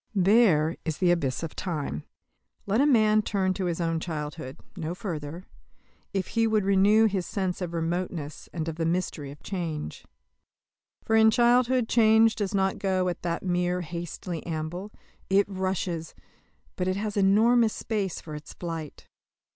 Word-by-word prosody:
There 185 -5 +4
is 160 -3 -3
the 180 -1 +3
abyss 140 -5 0
of 165 - -5
time. 150 - -3 0.6
Let 210 +5 +2
a 290 - +4
man 215 -5 +4
turn 190 -3 0
to 185 0 -3
his 175 -1 -1
own 165 -1 0
childhood 150 -4 -5 0.2
no 170 -1 -4
further 170 -2 -5 0.7
if 195 -1 -2
he 230 -1 +2
would 215 -3 +1
renew 200 +3 +5
his 195 -4 0
sense 190 -3 -2
of 175 -2 -3
remoteness, 165 -2 -3
and 160 -2 -4
of 165 -1 -4
the 165 - -1
mystery 165 -4 -2
of 140 +1 -12
change. 165 - -4 1.0
For 225 - +2
in 220 0 +7
childhood 245 +1 +3
change 225 -1 +5
does 205 -2 -2
not 190 -1 +1
go 185 -2 +1
at 175 - -5
that 170 -1 -2
mere 180 0 0
hasty 170 0 -5
amble; 170 +5 -4 0.4
it 195 +1 +4
rushes; 185 -4 -3 0.6
but 180 - -2
it 185 - +1
has 210 +1 -3
enormous 220 +3 +4
space 205 -5 -2
for 155 - -9
its 150 0 -8
flight. 165 -4 -6
185 Hz, 160 wpm, -27 LUFS, 165-205 Hz, 1.0 s, in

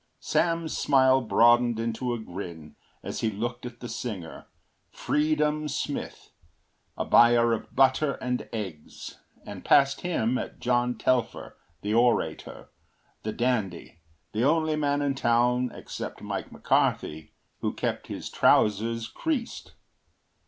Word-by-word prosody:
Sam’s 165 -1 0
smile 130 -1 +4
broadened 120 0 +4
into 115 +2 -2
a 120 - -1
grin 85 -7 -8 0.3
as - - -5
he 110 - 0
looked 120 +4 -4
at 120 -1 -12
the 120 - -5
singer, 110 -8 -6 0.4
Freedom 150 0 0
Smith, 145 0 -5 0.7
a - - -2
buyer 120 0 +5
of 115 - -5
butter 135 +2 +3
and 125 0 -4
eggs, 95 -9 -7 0.3
and - - -8
past 140 0 +4
him 130 -8 0
at - - -7
John 125 -1 0
Telfer, 125 -1 -1 0.3
the 105 +1 -1
orator, 120 +1 0 0.5
the 110 - -3
dandy, 105 -10 -2 0.3
the 110 +2 -1
only 155 +2 +2
man 145 -1 0
in 140 -1 +1
town, 125 0 +1
except - - -7
Mike - - -5
McCarthy, 80 +1 0 0.3
who - - -1
kept - - -3
his - - -6
trousers 115 +2 +2
creased. 290 - -4
120 Hz, 125 wpm, -27 LUFS, 115-140 Hz, 0.7 s, buyer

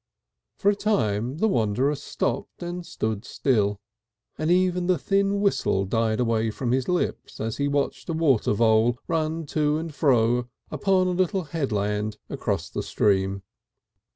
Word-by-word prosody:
For 200 - +3
a - - -2
time 125 - 0
the 220 - +2
wanderer 125 - +1
stopped 150 - -3
and 175 +1 -4
stood 110 -9 -3
still, 105 -6 0 0.6
and 155 - -2
even 180 0 +2
the 185 -1 +3
thin 200 0 +1
whistle 100 - +1
died 110 +2 0
away 115 -2 +1
from 120 +2 -3
his 130 0 +1
lips 180 -1 -2
as 110 0 -3
he 140 - 0
watched 145 +3 -1
a - - 0
water 145 -10 +2
vole 110 +2 +3
run 160 0 -1
to 150 -1 +2
and 160 -1 -5
fro 125 -4 +2 0.2
upon 190 -2 +2
a 185 - +1
little 185 +1 0
headland 105 -9 -2
across - - -2
the - - -4
stream. 95 -1 +1
135 Hz, 155 wpm, -25 LUFS, 110-175 Hz, 0.6 s, For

